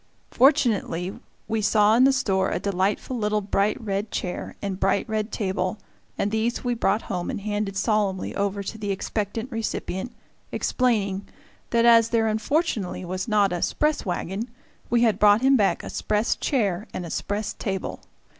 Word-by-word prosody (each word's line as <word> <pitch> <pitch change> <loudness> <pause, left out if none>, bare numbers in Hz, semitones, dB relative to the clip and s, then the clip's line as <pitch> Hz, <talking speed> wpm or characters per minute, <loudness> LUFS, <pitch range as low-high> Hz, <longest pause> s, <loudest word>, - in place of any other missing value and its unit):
Fortunately, 225 - +2 0.3
we 220 -1 0
saw 210 0 +4
in 250 +2 +6
the 270 - +6
store 195 -7 +1
a - - -1
delightful 200 +5 -1
little 210 0 +1
bright 200 +2 0
red 205 -2 -2
chair 180 -2 -4
and 195 -2 -4
bright 195 +1 +1
red 215 0 -2
table, 190 0 -1 0.4
and 205 - 0
these 220 +2 -1
we 245 -1 0
brought 225 -1 +1
home 180 -3 -3
and - - -3
handed 205 -1 -2
solemnly 205 -2 0
over 200 0 -1
to 220 +3 -6
the 205 -1 -3
expectant 210 +4 -3
recipient, 225 -1 -3 0.4
explaining 200 -6 0 0.4
that 235 0 +3
as 230 -1 +6
there 230 -1 +2
unfortunately 220 - -1
was 185 +3 -3
not 205 -4 +3
a 175 - -2
"'spress" 300 0 +1
wagon 195 +5 -3 0.4
we 240 0 +3
had 220 -4 +2
brought 210 +1 +6
him 270 +1 +5
back 205 -6 +2
a - - -6
"'spress" 215 +2 0
chair 210 - 0
and 180 - -3
"'spress" 210 +1 -2
table. 195 -2 -4
210 Hz, 165 wpm, -25 LUFS, 195-230 Hz, 0.4 s, in